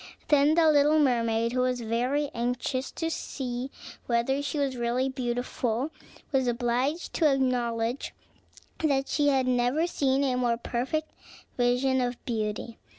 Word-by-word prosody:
Then 295 +1 +5
the 335 -1 +5
little 300 0 +5
mermaid, 230 -5 +2
who 255 - 0
was 250 -1 +1
very 250 +6 0
anxious 250 +2 -2
to 325 0 -2
see 255 -4 -4 0.4
whether 240 +4 +1
she 285 +1 -3
was 275 -2 0
really 245 +2 0
beautiful, 245 +1 -2 0.4
was 265 -3 +2
obliged 245 +7 -1
to 310 -4 +3
acknowledge 245 -2 0 0.7
that 275 -3 +1
she 290 -1 +1
had 265 -2 +3
never 250 +5 +2
seen 275 -5 +1
a 255 -2 +1
more 240 -2 +1
perfect 265 +7 -2 0.4
vision 250 +2 +2
of 245 -1 -1
beauty. 220 0 -3
255 Hz, 140 wpm, -27 LUFS, 240-280 Hz, 0.7 s, Then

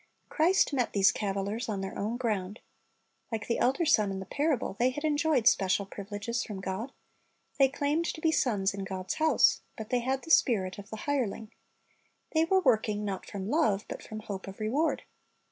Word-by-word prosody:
Christ 335 0 +3
met 250 -4 0
these 200 0 +5
cavilers 200 +3 -3
on 200 -3 -2
their 195 - -5
own 220 +4 -2
ground. 210 -4 -2 0.7
Like 220 -2 -3
the 235 - -1
elder 270 +7 +2
son 215 -9 +4
in 195 0 -4
the 190 - -6
parable, 285 - -1
they 245 +2 +4
had 290 +4 -6
enjoyed 295 -5 +2
special 195 +1 +3
privileges 205 +4 -4
from 205 -4 -6
God. 195 +7 -4 0.7
They 270 -1 +6
claimed 290 +4 0
to 320 - -3
be 320 0 +2
sons 210 -10 +1
in 200 -1 -5
God's 185 -1 -4
house, 315 0 +3 0.2
but 220 -2 -7
they 250 - +3
had 260 +2 -1
the 325 - -5
spirit 200 - +3
of 200 - -10
the 220 - -7
hireling. 235 -6 -2 0.8
They 320 0 +3
were 380 +2 +3
working, 215 - +2
not 195 -2 -4
from 195 -2 -5
love, 220 -11 +2
but - - -6
from 215 0 -8
hope 200 -3 -6
of 195 +2 -9
reward. 265 +10 0
220 Hz, 190 wpm, -29 LUFS, 200-280 Hz, 0.8 s, They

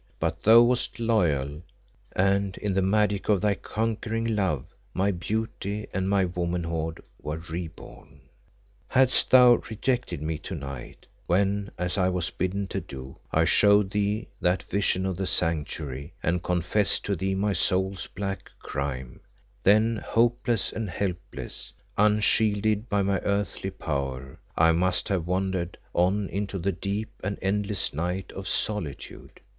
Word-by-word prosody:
But - - -1
thou 115 +2 +8
wast 125 +1 0
loyal, 80 - +1 0.5
and 100 +1 +2
in 100 -2 -1
the 95 - +2
magic 100 +1 +1
of 105 -3 +4
thy 105 -1 +3
conquering 115 +2 -2
love 90 -11 0 0.3
my 100 +2 +2
beauty 105 +2 -3
and 95 +1 0
my 100 -1 +3
womanhood 85 -2 -2 0.2
were 75 +1 -3
re 85 +1 -5
born. 75 -2 -14 0.7
"Hadst 130 -1 +4
thou 125 -2 +7
rejected 120 - -1
me 75 +1 -3
to 95 - -6
night, 70 -4 -8 0.2
when, 100 +2 +1
as 90 +3 -1
I 90 0 +3
was 90 -2 -1
bidden 95 +3 -1
to - - -2
do, 65 0 -9
I 80 +1 +3
showed 100 +3 +5
thee 105 +2 0
that 90 +1 +2
vision 95 -2 0
in 95 - 0
the 95 +1 -3
Sanctuary 75 -3 -2
and 85 +1 +1
confessed 90 +4 +1
to 100 - 0
thee 95 +2 -1
my 100 +1 +1
soul's 95 +1 +1
black 100 -1 -5
crime, 65 -3 -4 0.4
then 110 +3 +4
hopeless 115 0 +1
and 110 -3 -3
helpless, 90 -1 -4 0.2
unshielded 105 +1 +3
by 100 -1 +2
my 100 0 +1
earthly 100 -1 -1
power, 70 -7 -4 0.2
I 80 +1 +6
must 90 +2 +1
have 90 -4 0
wandered 90 -1 -1 0.2
on 95 +3 +2
into 100 0 -3
the 95 +2 0
deep 100 +4 -3
and 100 +1 -2
endless 100 +1 0
night 90 +5 -3
of 95 0 -6
solitude. 90 -8 -3
95 Hz, 145 wpm, -27 LUFS, 85-105 Hz, 0.7 s, thou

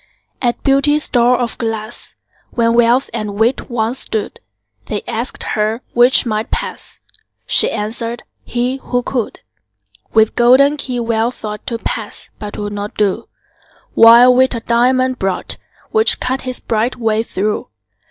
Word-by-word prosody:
At 240 -1 -1
Beauty's 290 +2 +3
door 245 0 +3
of 240 -2 -3
glass, 225 -1 -4 0.3
When 230 -1 +1
Wealth 240 +3 +3
and 215 -3 -4
Wit 235 +4 0
once 235 +1 -1
stood, 215 -2 -2 0.5
They - - -3
asked - - -4
her 220 +2 -1
'which 245 +3 +5
might 215 -1 -2
pass?" - - -4 0.4
She - - +5
answered, 230 +2 -4 0.2
"he, 245 +2 -2
who 245 -2 -2
could." 240 -4 -3 0.7
With 220 0 +3
golden 265 +5 +4
key 255 -3 -3
Wealth 230 +1 -1
thought 210 -1 -7
To 230 - -2
pass - - -6
but 210 -1 -7
'twould 205 0 -5
not 205 0 -6
do: 210 +2 -1 0.6
While 235 +2 +7
Wit 260 0 +3
a 230 - -4
diamond 255 +2 +1
brought, 190 -1 0 0.3
Which 440 0 +3
cut 260 +1 -2
his 255 -1 -5
bright 225 +2 -1
way 225 -2 0
through. 210 -1 -3
235 Hz, 145 wpm, -16 LUFS, 220-255 Hz, 0.7 s, While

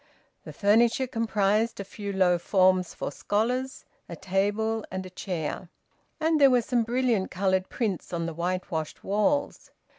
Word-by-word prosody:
The - - -7
furniture 230 +5 +3
comprised 225 -2 0
a - - -3
few 200 +1 -6
low 180 -2 +3
forms 185 0 +2
for - - -4
scholars, 250 +6 -2 0.2
a 170 - -6
table, 205 +5 -1
and 185 0 -5
a 185 - -10
chair; 175 -2 -4 0.5
and 315 -1 +2
there 275 - +8
were 250 -2 +3
some 245 +1 +1
brilliant 235 -4 0
coloured 190 0 0
prints 210 -10 -3
on 170 -1 -2
the 165 - -4
whitewashed 170 -2 -3
walls. 280 +9 0
200 Hz, 150 wpm, -27 LUFS, 185-230 Hz, 0.5 s, there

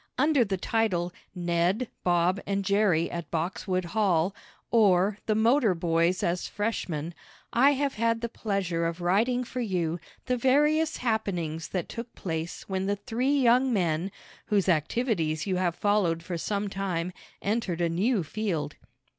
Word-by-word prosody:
Under 290 -1 +4
the 195 -3 -2
title 180 -4 0 0.2
"Ned, 175 +6 +1 0.2
Bob 175 +2 +2
and 200 0 -1
Jerry 200 -5 +2
at 170 -3 -5
Boxwood 185 +2 -2
Hall; 185 -2 +1 0.4
Or, 200 -2 +4
The 215 - +2
Motor 225 -2 +3
Boys 170 +1 +1
as 175 +1 0
Freshmen," 175 -7 -3 0.4
I 275 +4 +5
have 280 0 0
had 230 +1 0
the 235 - -1
pleasure 195 -7 -1
of 165 +1 -4
writing 220 +8 +2
for 250 +1 -6
you 175 -6 -1 0.3
the 250 -1 0
various 300 +5 +3
happenings 180 -9 -2
that 180 -3 -3
took 230 0 -7
place 165 -2 -4
when 190 0 -2
the 205 - +1
three 255 +7 0
young 250 +2 +4
men, 175 -3 0 0.4
whose 205 -3 +2
activities 165 - 0
you 190 -2 0
have 175 -2 0
followed 185 -6 +1
for 175 +1 -4
some 200 +4 -2
time, 185 -3 -2 0.3
entered 200 -5 -1
a 170 - +2
new 190 +5 +1
field. 160 -4 -3
195 Hz, 150 wpm, -27 LUFS, 170-230 Hz, 0.4 s, I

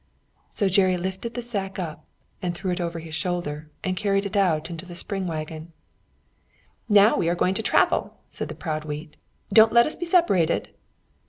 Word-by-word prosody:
So 200 - 0
Jerry 185 -1 +3
lifted 190 +6 -4
the 245 - -3
sack 200 -5 -4
up 165 -5 -5 0.4
and 175 -2 -2
threw 185 +1 -3
it 180 - -2
over 170 -1 -3
his 160 -1 -8
shoulder, 160 -4 -3
and 185 0 -1
carried 195 +1 0
it 200 - -4
out 175 -5 +2
into 165 0 -6
the 175 -1 -10
spring 195 +1 -3
waggon. 160 0 -6 1.2
"Now 205 +1 +6
we 170 - +1
are 175 - +1
going 180 +1 +1
to 195 - -1
travel," - - +2
said - - -5
the - - -6
proud 155 -3 -3
wheat 150 +1 -7 0.4
"Don't 220 +1 +7
let 235 0 +6
us 305 - -1
be 345 - -4
separated." 335 - +2
180 Hz, 185 wpm, -25 LUFS, 165-200 Hz, 1.2 s, Don't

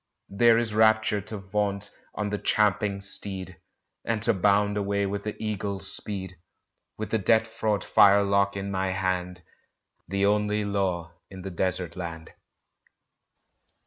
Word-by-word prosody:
There 115 +3 +4
is 115 -2 0
rapture 110 -1 +3
to 105 +2 -6
vault 100 0 -2 0.2
on 105 -1 -2
the 105 - -2
champing 105 -1 +1
steed, 95 -2 -2 0.4
And 115 -1 -1
to 115 - +3
bound 100 +1 +2
away 100 0 0
with 100 +1 -3
the 105 - -4
eagle's 100 -2 -4
speed, 95 -3 -6 0.6
With 110 - -5
the 110 - +1
death 110 +3 +3
fraught 110 -2 -2
firelock 100 0 +4
in 100 0 -4
my 95 -1 -1
hand 90 -2 -2 0.6
The 100 +2 0
only 105 0 +1
law 90 -4 -2 0.2
in 95 -2 -10
the 95 - -5
Desert 90 -1 +1
Land! 85 -2 -7
100 Hz, 140 wpm, -26 LUFS, 95-105 Hz, 0.6 s, There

